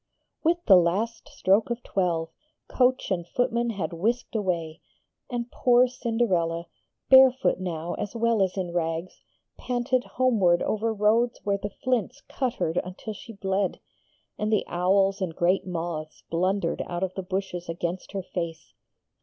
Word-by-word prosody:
With 340 +2 +1
the 190 - +8
last 205 +7 0
stroke 200 +5 +2
of 240 0 -3
twelve, 170 -4 0 0.4
coach 255 -3 +1
and 175 -2 -1
footmen 240 +2 0
had 185 -7 -3
whisked 230 +9 -1
away, 170 -6 -2 0.5
and 240 -1 -4
poor 250 0 +4
Cinderella, 205 -9 0 0.4
barefoot 265 -4 +6
now 175 -2 -3
as 205 - -5
well 230 -2 +2
as 190 0 0
in 180 -2 -3
rags, 165 +1 -2 0.4
panted 250 +1 0
homeward 210 -9 +2
over 220 +1 0
roads 220 +3 +2
where 200 -1 0
the 205 - -4
flints 250 +5 -2
cut 255 -2 -2
her 160 - 0
until 185 +4 -7
she 225 +3 -11
bled, 195 -1 -1 0.6
and 210 +1 0
the 215 - +2
owls 195 +2 +2
and 170 -4 -2
great 180 +2 +1
moths 165 -3 -5
blundered 180 +1 0
out 175 +1 -3
of 185 -1 -2
the 190 - -4
bushes 185 -2 -4
against 175 +3 -4
her 195 -1 -3
face. 170 -2 -5
195 Hz, 150 wpm, -26 LUFS, 175-235 Hz, 0.6 s, the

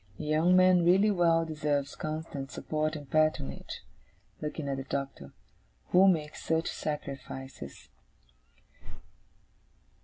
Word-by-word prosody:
A - - -6
young 155 +4 +3
man 185 -1 +6
really 190 +5 +5
well 165 -3 +3
deserves 150 -3 -1
constant 155 -3 -5
support 155 +2 -2
and 145 -2 -8
patronage,' 155 - 0 0.6
looking 150 -1 -4
at 135 -1 -1
the 135 - -4
Doctor, 135 - -5 0.6
'who 185 +2 +6
makes 155 -5 +1
such 160 0 0
sacrifices. 135 - -6
155 Hz, 110 wpm, -30 LUFS, 140-165 Hz, 0.6 s, man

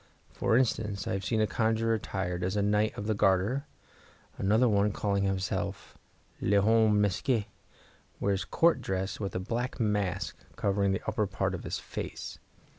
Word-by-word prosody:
For 110 - +2
instance, 110 -5 0
I - - -1
have 95 0 -2
seen 110 -2 +1
a - - +4
conjurer 115 +2 +1
attired 95 -4 -2
as 95 +3 -1
a 100 - +2
Knight 105 +1 +1
of 105 - -4
the 110 - +1
Garter; 100 +8 +2 0.7
another 110 +6 +3
one, 105 -1 +3
calling 100 -1 0
himself 95 -1 -2 0.5
L'homme 105 +1 +4
masqué, 105 +3 +1 0.7
wears 100 -1 0
Court 170 0 +3
dress 95 +1 -2
with 100 -2 -4
a - - 0
black 120 +8 -3
mask 105 -4 0 0.2
covering 100 0 +1
the 95 - -2
upper 105 - 0
part 95 - -1
of - - -5
his - - -2
face. - - -6
105 Hz, 160 wpm, -29 LUFS, 95-110 Hz, 0.7 s, a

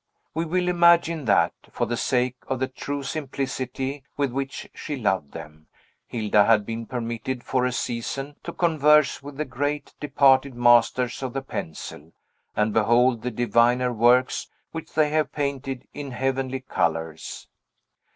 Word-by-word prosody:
We 165 +2 -1
will 180 +2 0
imagine 170 -3 +4
that, 100 - +3 0.2
for - - -1
the 120 - -2
sake 125 +1 0
of 130 - -1
the 130 - 0
true 140 +2 -5
simplicity 135 -1 -4
with 140 -3 0
which 135 +2 -4
she 150 - -5
loved 95 - -1
them, 75 +1 -10 0.4
Hilda 105 -3 +3
had 110 -3 +4
been 115 +1 -5
permitted, 120 0 -4
for 125 -1 +1
a - - -1
season, 130 +4 -3
to - - -6
converse 150 -4 +3
with 140 0 -10
the 155 - -1
great, 145 +3 -3
departed 140 -2 +3
masters 120 +1 +3
of 130 -2 -4
the 135 0 -3
pencil, 80 - -7 0.4
and 105 0 +1
behold 120 +2 +3
the 125 - -2
diviner 120 +1 +2
works 120 +3 +3 0.2
which 160 -1 -7
they 155 -1 +3
have 155 0 +1
painted 135 -3 -3
in 145 -1 -6
heavenly 130 0 -2
colors. 80 -9 -2
130 Hz, 150 wpm, -24 LUFS, 120-140 Hz, 0.4 s, imagine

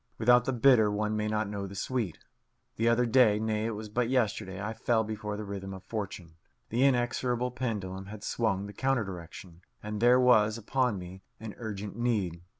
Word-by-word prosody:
Without 120 +1 +5
the - - 0
bitter 120 -3 +5
one 105 +1 -1
may 105 0 -1
not 110 0 0
know 100 -1 -4
the 100 - -10
sweet. 110 -4 -2 0.6
The 115 +1 +2
other 120 +1 +3
day 115 -3 +5
nay, 110 0 -1
it 115 - -3
was 110 +1 -6
but 115 +3 -1
yesterday 105 -6 0
I 105 +2 -3
fell 115 0 +1
before 105 -1 -4
the 105 - -5
rhythm 95 -1 -6
of 95 - -11
fortune. 95 -6 -6 0.3
The 120 +4 +1
inexorable 125 -1 +1
pendulum 100 -6 -4
had 105 0 -9
swung 100 -5 -1
the 100 - -9
counter 130 -1 +1
direction, 90 -2 -9 0.2
and 105 0 -4
there 125 +1 +6
was 110 -4 +4
upon 125 0 0
me 90 +1 -9 0.2
an 110 -2 -7
urgent 105 -3 -5
need. 105 -8 -1
110 Hz, 190 wpm, -29 LUFS, 100-120 Hz, 0.6 s, there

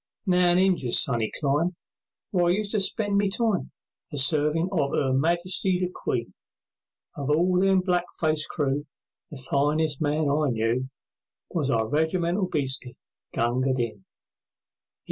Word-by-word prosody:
Now 180 -2 +3
in - - +3
Injia's 180 -10 +3
sunny 115 -5 +1
clime, 150 +5 0 0.6
Where 180 -3 +2
I - - +3
used 210 0 -2
to 215 - +1
spend 200 +1 0
my 200 - +2
time, 215 -2 -1 0.4
A 145 - -5
servin' 150 +4 +3
of 145 -7 0
'Er 135 -2 +1
Majesty 175 +6 +1
the 180 -1 -2
Queen, 115 -2 -3 0.8
Of 140 -1 -4
all 180 +4 +3
them 190 -1 +3
blackfaced 175 -4 -1
crew, 145 -1 -1 0.4
The 145 - -8
finest 145 +3 0
man 150 0 +1
I 145 +1 +1
knew 120 +3 -1 0.6
Was 150 -6 -1
our 110 -3 +1
regimental 170 - 0
bhisti, 135 -5 -2 0.4
Gunga 130 +3 0
Din. 110 -6 -3
155 Hz, 140 wpm, -25 LUFS, 135-180 Hz, 0.8 s, Now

